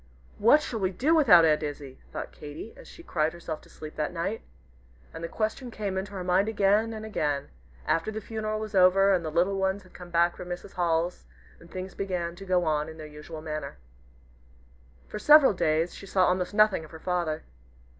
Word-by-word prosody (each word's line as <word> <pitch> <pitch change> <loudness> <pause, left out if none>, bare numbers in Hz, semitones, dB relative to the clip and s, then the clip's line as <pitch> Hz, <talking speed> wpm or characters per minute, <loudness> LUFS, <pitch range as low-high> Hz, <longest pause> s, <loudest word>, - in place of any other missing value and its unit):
"What 285 +8 +6
shall 225 - -4
we 190 -2 +1
do 260 - +1
without 220 - +7
Aunt 155 -1 +3
Izzie?" 145 -3 -6
thought - - -6
Katy, 150 +9 -9
as - - -14
she 340 - -13
cried 155 - 0
herself 170 -2 -6
to - - -19
sleep 155 0 -10
that 150 -1 -1
night. 180 +6 -3 0.7
And 165 - -8
the - - -2
question 220 +6 -3
came 205 -4 -4
into 190 +1 -4
her 190 -2 -4
mind 185 +4 +2
again 210 +1 +2
and 220 -1 -6
again, 150 -10 -2 0.4
after 165 +5 +1
the 220 - -4
funeral 215 0 -3
was 215 -1 -6
over 195 +1 +5
and 180 -2 +1
the 160 - -3
little 180 +5 +1
ones 190 +1 0
had 185 - -20
come 180 -1 -11
back 170 0 +2
from 180 - -9
Mrs. 180 +2 -6
Hall's, 170 - 0 0.3
and 170 - -16
things 185 +1 -6
began 180 -3 -3
to 195 - -9
go 180 -2 +2
on 155 0 0
in 160 - -10
their 155 - -8
usual 155 +1 -9
manner. 155 - -5 1.3
For - - -6
several 295 -2 +7
days 160 -1 +1
she 195 - -10
saw 185 -1 +3
almost 180 +2 0
nothing 215 -5 +4
of 155 - -12
her 160 - -11
father. 170 -3 -2
180 Hz, 205 wpm, -27 LUFS, 160-205 Hz, 1.3 s, without